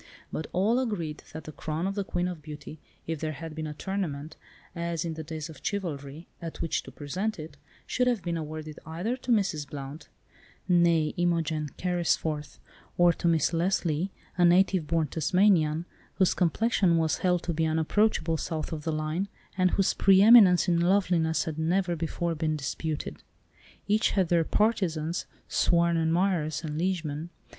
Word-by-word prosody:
But 155 - -4
all 215 +7 +2
agreed 175 -12 -3
that 160 0 -7
the 155 - -8
crown 155 +3 -3
of 195 - -1
the 200 0 -2
Queen 180 -1 -1
of 175 -3 -6
Beauty, 150 0 -9 0.3
if 165 -2 -3
there 155 0 -3
had 160 +2 -7
been 155 0 -4
a 150 - -6
tournament, 160 -6 -4 0.4
as 170 -1 -2
in 165 - -2
the 160 - -6
days 155 0 -6
of 160 -4 -12
chivalry, 155 -6 -4
at 165 -1 -7
which 165 - -1
to - - -12
present 185 +10 -3
it, 155 -2 -8 0.3
should 250 0 0
have 240 -6 +1
been 170 -1 -2
awarded 155 -1 -6
either 175 +10 -3
to 250 -1 -4
Mrs. 185 -10 +1
Blount 140 +2 -8 0.6
(née 170 -3 +3
Imogen 165 -3 0
Carrisforth) 165 -4 -1 0.4
or 175 -1 +5
to 170 - -2
Miss 160 -1 +2
Leslie, 170 0 0 0.3
a - - +5
native 175 -1 +4
born 165 0 +1
Tasmanian, 165 0 +2 0.3
whose 190 -2 +3
complexion 185 -1 +2
was 160 -1 +1
held 180 -2 +1
to 170 - -2
be 160 0 +1
unapproachable 160 +1 +1
south 160 0 -4
of 155 -2 -5
the 160 - -1
Line, 155 +5 -2 0.3
and 185 -1 +3
whose 195 +1 +2
pre 195 0 +5
eminence 205 -6 +8
in 170 -1 +3
loveliness 175 -3 +2
had 160 -1 -5
never 175 +2 +1
before 170 +1 -2
been 155 -1 -1
disputed. 150 +2 -4 0.7
Each 210 +1 +3
had 190 -4 +1
their 170 -2 +3
partisans, 175 -7 0 0.2
sworn 170 0 +2
admirers 165 -1 +1
and 155 -1 -4
liegemen. 165 -3 -2
165 Hz, 165 wpm, -28 LUFS, 155-185 Hz, 0.7 s, eminence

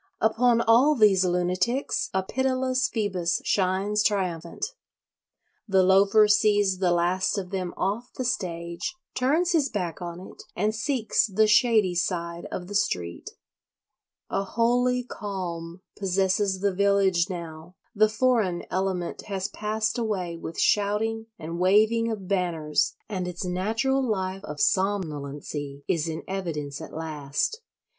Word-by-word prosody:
Upon 230 +2 +3
all 245 +7 +5
these 205 -6 +5
lunatics 180 +9 0
a 190 0 0
pitiless 255 +3 0
Phoebus 190 -5 -1
shines 195 +2 +1
triumphant. 180 - -1 1.0
The 190 -2 +4
Loafer 195 +3 +5
sees 205 -2 +3
the 185 -2 +2
last 175 +3 +1
of 185 -2 -4
them 185 -2 -2
off 210 +6 -2
the 255 - -4
stage, 170 - -3 0.2
turns 305 +8 +1
his 305 -5 +2
back 180 -4 -3
on 175 0 -6
it, 185 - -11
and 210 +3 0
seeks 225 0 +1
the 215 +2 +3
shady 215 -3 +4
side 170 -1 -2
of 180 - -4
the 200 - -9
street. 90 - -1 1.0
A 195 - 0
holy 245 +4 +1
calm 180 -6 -6
possesses 190 0 0
the 200 -1 +1
village 195 -2 +2
now; 170 -1 -7 0.2
the 215 -1 +4
foreign 220 -6 +1
element 185 -2 -2
has 195 -2 -3
passed 220 +2 -2
away 190 -7 -2
with 165 0 -7
shouting 220 +2 +1
and 165 +2 -6
waving 215 +5 +3
of 200 -4 -5
banners, 170 -6 0
and 185 -4 -3
its 180 +1 -5
natural 220 +9 0
life 195 -4 -2
of 150 - -7
somnolency 145 -7 -1
is 165 -2 0
in 160 0 -4
evidence 160 -7 -4
at 160 - -8
last. 155 - -3
195 Hz, 135 wpm, -26 LUFS, 175-220 Hz, 1.0 s, all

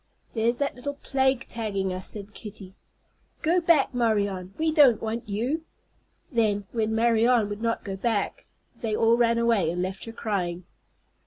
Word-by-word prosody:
"There's 235 +1 +1
that 280 +1 0
little 285 +3 -5
plague 265 -2 +1
tagging 195 -5 -2
us," 185 +1 -4
said 205 0 -6
Kitty. 205 -4 -10 0.7
"Go 345 +3 +3
back, 330 -6 +3
Marianne; 205 -6 0
we 320 0 +1
don't 285 -8 +6
want 225 +1 -4
you." 245 +11 -1 0.7
Then, 210 -5 +1
when 220 -1 0
Marianne 230 -1 +3
would 205 +1 -5
not 230 0 -1
go 195 -3 -4
back, 210 0 -2 0.3
they 220 -2 -2
all 225 +1 +4
ran 235 -1 +3
away, 230 -8 +2
and 175 +2 -1
left 190 +1 -5
her 225 - -7
crying. 185 -6 -2
225 Hz, 160 wpm, -26 LUFS, 200-240 Hz, 0.7 s, don't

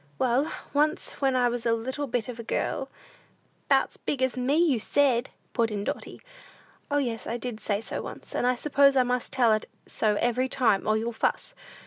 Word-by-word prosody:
Well, 260 +4 +1 0.2
once 300 +2 +1
when 270 -1 +2
I 250 -1 +3
was 240 -1 -2
a 230 - +2
little 260 +5 -3
bit 240 -3 -1
of 245 -2 -7
a - - -5
girl - - -2 0.4
" - - -38
"'Bout's - - +2
big 260 -3 -2
as 260 -1 +1
me, 255 +3 +1
you 320 -8 +3
said," 260 +1 +2 0.2
put 230 -2 +2
in 205 -2 -3
Dotty. - - -5 0.7
"O, 290 - +1
yes, 240 -5 -2
I 235 - -2
did 240 -2 -5
say 205 -1 -1
so - - -4
once, - - -9
and 245 - +1
I 250 - +3
suppose 280 +1 +3
I 260 - +5
must 250 0 -1
tell 240 -4 +4
it 215 - -1 0.2
so 215 -1 0
every 245 +4 +1
time, 225 -7 +2
or 215 0 +3
you'll 230 +2 -2
fuss! - - -1
245 Hz, 205 wpm, -27 LUFS, 230-265 Hz, 0.7 s, I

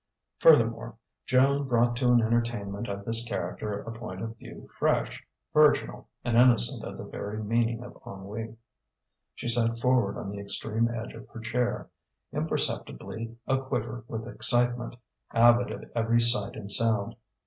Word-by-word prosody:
Furthermore, - - +4 0.3
Joan 140 +2 +3
brought 120 -1 +2
to 125 - +1
an 120 -1 +5
entertainment 115 -2 -1
of 100 0 -5
this 115 0 0
character 105 -2 -4
a 115 - -7
point 105 -4 -7
of 115 0 -6
view - - -12
fresh, - - 0 0.3
virginal, 150 -1 +3 0.2
and 120 -2 0
innocent 120 - +5
of - - -7
the - - -7
very 105 +1 -6
meaning 115 +2 0
of 125 - -12
ennui. 105 +3 -7 0.8
She - - -6
sat 115 -1 +3
forward 125 -5 +2
on 100 - -5
the 100 - -6
extreme 110 +3 0
edge 115 -1 -5
of 115 +3 -11
her - - -10
chair, 120 +2 -2 0.5
imperceptibly 115 - -3
a 135 0 +1
quiver 120 -3 -4
with 115 0 -5
excitement, 120 0 +1 0.4
avid 120 +1 +5
of - - -7
every 115 0 +2
sight 120 +2 +2
and 100 -2 -5
sound. 110 -2 +1
115 Hz, 150 wpm, -28 LUFS, 110-120 Hz, 0.8 s, an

